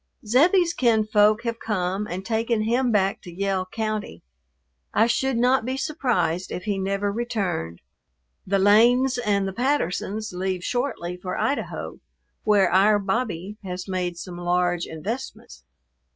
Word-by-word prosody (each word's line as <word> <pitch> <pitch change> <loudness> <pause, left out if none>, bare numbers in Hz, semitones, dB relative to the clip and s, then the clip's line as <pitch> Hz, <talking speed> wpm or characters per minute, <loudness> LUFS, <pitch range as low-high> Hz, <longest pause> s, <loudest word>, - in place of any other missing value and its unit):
Zebbie's 335 - +4
kinsfolk 215 -3 +3
have 230 -1 -3
come 195 -1 -2
and 185 +1 -5
taken 225 0 0
him 240 +3 +1
back 195 -2 +1
to 180 - -10
Yell 190 +1 -1
County. 215 - -4 0.7
I 220 - +5
should 250 +2 0
not 250 +1 +3
be 260 +3 -3
surprised 245 - -1
if 180 - -5
he 205 -2 -1
never 195 +1 -1
returned. 200 - -3 0.7
The 195 +1 +2
Lanes 240 +6 +4
and 200 -4 +1
the 190 - -4
Pattersons 215 - -1
leave 185 0 -2
shortly 245 -9 -2
for 180 0 -5
Idaho, 280 - -3 0.4
where 205 -4 +3
"our 205 +3 +5
Bobbie" 200 -2 -2
has 185 0 -5
made 180 -2 -2
some 175 0 -8
large 175 0 0
investments. 160 - -6
205 Hz, 135 wpm, -24 LUFS, 185-235 Hz, 0.7 s, I